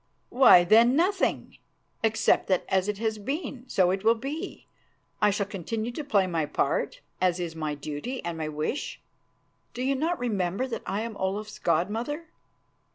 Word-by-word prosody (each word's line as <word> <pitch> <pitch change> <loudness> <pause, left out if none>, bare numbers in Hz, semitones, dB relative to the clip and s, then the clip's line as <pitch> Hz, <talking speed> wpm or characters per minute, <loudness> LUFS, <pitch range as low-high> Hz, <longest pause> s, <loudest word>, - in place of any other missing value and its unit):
"Why, 245 -9 +7
then 230 +7 +5
nothing, 365 +5 0 0.4
except 225 -1 +2
that 185 -2 +1
as 190 0 +1
it 210 -1 -1
has 220 0 -2
been, 270 - -4
so 180 -2 +3
it 190 +1 -2
will 225 +1 +5
be. 275 +7 -6 0.6
I 210 - +5
shall 200 0 0
continue 215 +4 -4
to 300 +5 -5
play 205 -9 +2
my 165 -4 -1
part, - - -1 0.2
as 180 -1 +2
is 170 -2 -4
my 155 -2 -3
duty 150 - -5
and 170 -1 -3
my 155 -1 -3
wish. 155 - -3 0.8
Do 250 - -3
you 270 +1 +2
not 320 +6 0
remember 200 -1 -1
that 255 - -4
I 195 +3 -1
am 230 -1 -5
Olaf's 205 +3 -3
god 170 +3 +1
mother?" 290 +9 -4
210 Hz, 170 wpm, -27 LUFS, 180-250 Hz, 0.8 s, Why